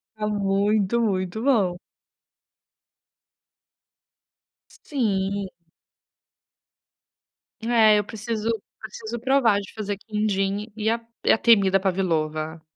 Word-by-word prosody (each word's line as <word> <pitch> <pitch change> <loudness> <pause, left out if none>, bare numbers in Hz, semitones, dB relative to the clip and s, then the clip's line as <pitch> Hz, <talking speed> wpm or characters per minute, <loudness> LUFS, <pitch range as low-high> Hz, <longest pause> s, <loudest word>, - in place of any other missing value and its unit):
Tá 215 - -3
muito, 205 +2 +1
muito 195 0 -1
bom. 205 -10 +2 2.9
Sim. 200 -7 -2 2.1
É, 225 -2 +5
eu - - -1
preciso 220 +1 -4 0.3
preciso 220 +2 -7
provar 245 -4 +3
de 200 - -10
fazer 205 -2 -4
quindim 210 0 -2
e 220 0 -1
a 230 +1 +1 0.3
e - - +5
a - - +5
temida 195 -5 +4
Pavilova. 160 -4 -1
210 Hz, 90 wpm, -24 LUFS, 195-225 Hz, 2.9 s, É